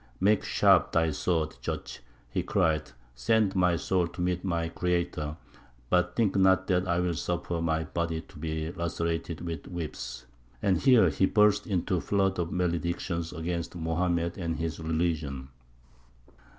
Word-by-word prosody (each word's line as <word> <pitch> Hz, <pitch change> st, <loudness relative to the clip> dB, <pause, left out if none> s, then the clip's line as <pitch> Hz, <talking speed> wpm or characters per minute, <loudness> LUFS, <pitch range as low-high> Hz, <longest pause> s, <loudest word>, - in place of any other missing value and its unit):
"Make 105 Hz, +1 st, +3 dB
sharp -, -, +4 dB
thy 80 Hz, -1 st, +3 dB
sword, 80 Hz, 0 st, -1 dB
judge," -, -, -5 dB, 0.3 s
he -, -, 0 dB
cried; 80 Hz, -1 st, +1 dB, 0.2 s
"send 95 Hz, -, +2 dB
my 90 Hz, -2 st, +3 dB
soul 90 Hz, 0 st, +1 dB
to 90 Hz, -, -12 dB
meet 90 Hz, 0 st, 0 dB
my 85 Hz, -3 st, -1 dB
Creator; 85 Hz, -3 st, -2 dB, 0.5 s
but 90 Hz, 0 st, +2 dB
think 110 Hz, -5 st, +2 dB
not 95 Hz, -1 st, +4 dB
that 90 Hz, 0 st, +2 dB
I 85 Hz, 0 st, +1 dB
will 90 Hz, -1 st, +1 dB
suffer 85 Hz, 0 st, -2 dB
my 80 Hz, -1 st, 0 dB
body 80 Hz, +1 st, -2 dB
to 85 Hz, -1 st, -15 dB
be 80 Hz, +1 st, -3 dB
lacerated 85 Hz, -1 st, -3 dB
with 85 Hz, -1 st, -5 dB
whips." 65 Hz, -7 st, -6 dB, 0.3 s
And 95 Hz, -3 st, +2 dB
here 125 Hz, -9 st, +6 dB
he 75 Hz, +7 st, +2 dB
burst 105 Hz, 0 st, +3 dB
into 95 Hz, -2 st, 0 dB
a -, -, -2 dB
flood 95 Hz, -2 st, +1 dB
of 85 Hz, -1 st, -1 dB
maledictions 85 Hz, -1 st, -1 dB
against 85 Hz, +2 st, -4 dB
Mohammed 85 Hz, +1 st, -1 dB
and 85 Hz, -2 st, -2 dB
his 80 Hz, 0 st, -3 dB
religion. 80 Hz, -5 st, -2 dB
85 Hz, 150 wpm, -28 LUFS, 80-90 Hz, 0.5 s, here